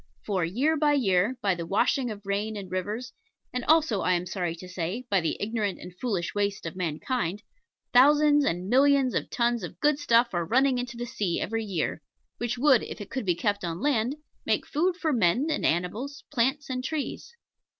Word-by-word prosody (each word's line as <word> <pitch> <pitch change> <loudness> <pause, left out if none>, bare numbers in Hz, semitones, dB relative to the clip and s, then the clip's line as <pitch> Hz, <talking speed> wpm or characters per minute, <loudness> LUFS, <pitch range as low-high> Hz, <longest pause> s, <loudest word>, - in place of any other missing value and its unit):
For, 190 -4 0
year 255 - +1
by 295 0 +3
year 215 -2 +2
by 195 -2 +3
the 170 -1 -5
washing 240 +6 +1
of 210 -2 -8
rain 205 +2 -2
and 195 -2 -8
rivers, 210 +7 -3 0.4
and 250 -1 -2
also, 310 -10 +3
I 185 - +2
am 175 0 0
sorry 175 -2 -3
to 180 +2 -10
say, 185 +7 -4
by 195 -2 +3
the 165 - -1
ignorant 210 -2 -2
and 180 0 -10
foolish 200 -9 -2
waste 205 -2 -1
of 165 - -5
mankind 185 - -2 0.5
thousands 295 +3 +6
and 180 -5 -1
millions 270 +2 +4
of - - -2
tons 240 -1 +1
of 175 -1 -8
good 295 -1 +2
stuff 235 -4 +3
are 175 -1 0
running 255 +7 +2
into 245 -1 -5
the 240 - -3
sea 210 -8 -2
every 225 +3 -2
year, 185 -6 -2 0.4
which 240 0 -2
would, 265 -2 +5
if - - -7
it 205 - -9
could 260 -5 -3
be 175 - +3
kept 200 +3 -1
on 170 -1 -3
land, 255 0 +1 0.3
make - - 0
food 345 +4 0
for 320 -4 0
men 230 - +2
and 300 - +1
animals, 210 - -2
plants 270 +2 0
and 255 -1 -3
trees. 315 - -4
225 Hz, 200 wpm, -27 LUFS, 185-265 Hz, 0.5 s, thousands